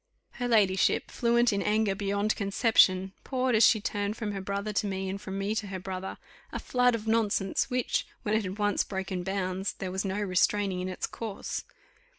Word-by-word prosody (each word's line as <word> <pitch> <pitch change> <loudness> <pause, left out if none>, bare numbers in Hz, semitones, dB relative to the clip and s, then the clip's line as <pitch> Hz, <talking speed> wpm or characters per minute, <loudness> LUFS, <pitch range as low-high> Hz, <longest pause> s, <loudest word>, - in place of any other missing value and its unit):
Her 245 - 0
ladyship, 200 -5 +3
fluent 235 -1 +3
in 200 - 0
anger 210 -1 +2
beyond 200 +1 0
conception, 195 -2 +3
poured, 255 -1 0
as 220 0 +5
she 220 - +6
turned 205 +1 -2
from 215 -2 -3
her 195 -1 -4
brother 200 +2 -3
to 205 - 0
me, 190 -1 -3
and 195 +1 -4
from 190 -1 -5
me 200 +2 -1
to 220 -2 -2
her 195 -1 -4
brother, 190 0 -5 0.3
a - - -3
flood 250 -1 +2
of 220 -1 -5
nonsense, 220 -3 +1
which, 250 -1 0 0.2
when 210 -2 -1
it 220 - +3
had 190 +1 -5
once 205 -1 +1
broken 190 -2 -4
bounds, 190 0 -2
there 185 -1 -5
was 190 +1 -2
no 195 +1 -2
restraining 195 -1 +1
in 185 - -3
its 185 - -3
course. 220 -4 -5
200 Hz, 195 wpm, -29 LUFS, 190-220 Hz, 0.3 s, she